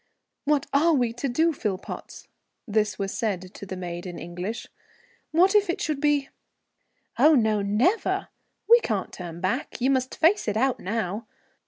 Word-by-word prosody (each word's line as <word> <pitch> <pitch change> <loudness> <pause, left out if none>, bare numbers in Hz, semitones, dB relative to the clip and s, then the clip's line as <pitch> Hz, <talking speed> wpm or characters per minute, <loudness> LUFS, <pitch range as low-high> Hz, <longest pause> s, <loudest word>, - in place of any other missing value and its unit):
"What 295 -1 +2
are 320 +4 +4
we 245 -4 +1
to 245 +3 -3
do, 320 +7 +2
Philpotts?" 210 -9 -5 0.4
This 210 -2 +1
was 195 -1 -3
said 190 -4 -2
to 200 - -9
the 185 - -5
maid 175 0 -5
in 175 -1 -7
English. 180 +6 -5 0.6
"What 360 +5 +4
if 415 -3 +4
it 350 - -1
should 300 -3 -2
be 290 -2 +2 0.4
" - - -27
"Oh, 310 0 +7
no, 220 -4 +2
never! 230 - +1 0.4
We 470 +1 +8
can't 210 - -2
turn 170 -2 -7
back. 235 +10 -2
You 260 +2 +2
must 260 -1 0
face 345 - +3
it 210 0 0
out 260 +2 +1
now. 210 +1 -3
230 Hz, 170 wpm, -25 LUFS, 195-295 Hz, 0.6 s, We